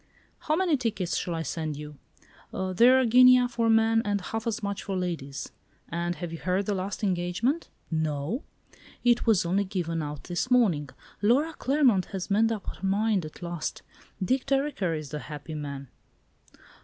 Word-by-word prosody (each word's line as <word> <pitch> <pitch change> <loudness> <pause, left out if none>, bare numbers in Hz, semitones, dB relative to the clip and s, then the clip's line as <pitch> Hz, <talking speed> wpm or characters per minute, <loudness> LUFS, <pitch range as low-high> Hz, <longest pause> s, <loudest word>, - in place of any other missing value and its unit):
"How 310 - 0
many 340 -4 +2
tickets 220 -8 -2
shall 175 - -2
I 165 - -2
send 155 -3 -3
you? 150 -1 -9 0.5
They're 230 +8 +4
a 260 - +3
guinea 250 +1 +7
for 235 -2 0
men 225 0 +4
and 205 -2 0
half 225 +4 -4
as 220 -1 -2
much 200 -1 -2
for 195 -1 -3
ladies; 165 -7 -4 0.4
and 170 +1 -2
have 175 -2 -6
you 165 - -6
heard 185 +2 0
the 205 - 0
last 195 +2 -4
engagement? 190 - 0 0.2
No? 155 - -1 0.6
It 240 -1 +3
was 210 -6 +4
only 190 +4 +2
given 175 -4 -2
out 150 -2 -5
this 175 +7 -2
morning. 190 - +3 0.3
Laura 270 +10 +3
Claremont 255 - +2
has 190 0 -6
made 225 +3 +3
up 215 -3 -4
her - - -7
mind 200 -2 +1
at 155 +3 -10
last; 170 -2 -4 0.4
Dick 255 +8 0
Dereker 270 - 0
is 155 -2 -7
the 150 +2 -4
happy 150 +2 -8
man!" 140 -2 -5
195 Hz, 170 wpm, -27 LUFS, 165-235 Hz, 0.6 s, guinea